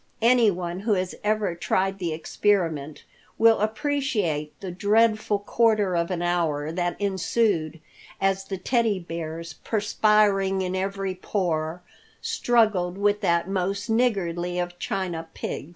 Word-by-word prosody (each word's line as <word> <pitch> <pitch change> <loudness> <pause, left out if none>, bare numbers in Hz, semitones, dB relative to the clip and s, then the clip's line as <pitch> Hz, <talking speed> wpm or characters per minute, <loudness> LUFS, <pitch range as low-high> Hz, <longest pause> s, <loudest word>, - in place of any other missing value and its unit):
Anyone 200 -8 +3
who 210 +2 +1
has 185 -2 -1
ever 210 -3 +1
tried 190 +3 -1
the 175 -3 -2
experiment 160 -3 -1 0.3
will 225 0 +5
appreciate 215 - -1
the 190 -2 -6
dreadful 215 +2 +2
quarter 210 -2 +2
of 170 0 0
an 175 -2 -2
hour 160 -4 0
that 175 +1 -2
ensued 190 -4 0 0.4
as 195 0 +1
the 195 -1 -4
Teddy 230 0 +1
Bears, 165 -2 -6
perspiring 205 -2 +2
in 185 0 -2
every 195 0 -2
pore, 175 -3 -2 0.4
struggled 210 -7 +1
with 205 +1 +1
that 170 -3 +1
most 195 +3 -2
niggardly 180 -7 0
of 175 0 -3
china 175 -4 -3
pigs. 150 - -5
190 Hz, 125 wpm, -25 LUFS, 175-210 Hz, 0.4 s, will